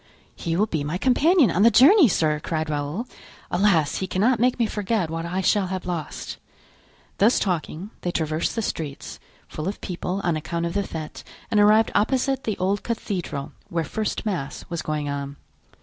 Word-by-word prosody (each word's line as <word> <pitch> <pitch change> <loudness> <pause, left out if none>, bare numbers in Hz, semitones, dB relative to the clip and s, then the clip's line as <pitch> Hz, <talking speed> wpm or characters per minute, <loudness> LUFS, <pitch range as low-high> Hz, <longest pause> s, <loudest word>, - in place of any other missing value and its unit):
"He 165 -1 -2
will 205 +5 +3
be 160 -8 -2
my 150 +5 -2
companion 280 - +4
on 180 - +1
the 230 - +8
journey, 300 - +7
sir," 155 -6 +1
cried 155 0 -2
Raoul. 150 - -2 0.5
"Alas! 175 -5 +2
he 190 - -2
cannot 220 +7 +2
make 250 +2 +2
me 235 - +2
forget 205 -5 -1
what 165 +1 -3
I 185 +2 -1
shall 195 +1 +2
have 185 0 -4
lost!" 170 -4 -5 0.8
Thus 220 +5 +5
talking, 180 +1 -2
they 180 - -2
traversed 160 -1 -1
the 225 - -1
streets, 150 -7 -5 0.3
full 155 +2 -5
of 200 - -3
people 180 +1 -3
on 170 -2 +1
account 170 +2 -3
of 170 - -3
the 200 - +1
fete, 160 -5 -7 0.3
and 210 - +3
arrived 215 +2 +5
opposite 265 +5 +1
the 215 -3 -1
old 195 +3 0
cathedral, 180 -11 -4 0.2
where 170 -3 -1
first 215 +7 -3
mass 175 -10 -3
was 170 - -2
going 150 -1 -2
on. 140 0 -4
185 Hz, 180 wpm, -24 LUFS, 160-215 Hz, 0.8 s, the